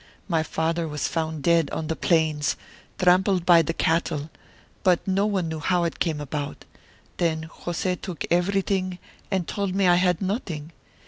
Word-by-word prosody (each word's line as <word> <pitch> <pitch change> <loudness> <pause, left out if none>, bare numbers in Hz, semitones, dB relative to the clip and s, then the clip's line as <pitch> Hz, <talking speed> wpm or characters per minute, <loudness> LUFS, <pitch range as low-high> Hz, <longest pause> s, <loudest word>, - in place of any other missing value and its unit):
My 165 -4 +2
father 165 +1 -1
was 150 -1 -2
found 160 -3 -2
dead 165 -2 +3
on 160 - -3
the 160 +1 -2
plains, 155 -4 +1 0.4
trampled 185 0 +3
by 175 -2 +7
the 165 - -1
cattle, 160 -2 0 0.5
but 180 0 +2
no 195 +2 +2
one 190 -5 0
knew 160 -1 -4
how 175 +3 +1
it 170 - -2
came 160 -3 0
about. 145 0 -5 0.5
Then 160 -2 0
José 180 +1 -3
took 180 -5 -4
everything 185 +1 +1 0.3
and 190 -4 -1
told 200 -2 -2
me 195 -1 +3
I 175 0 +6
had 180 -2 +2
nothing. 180 - -3
170 Hz, 160 wpm, -25 LUFS, 160-185 Hz, 0.5 s, by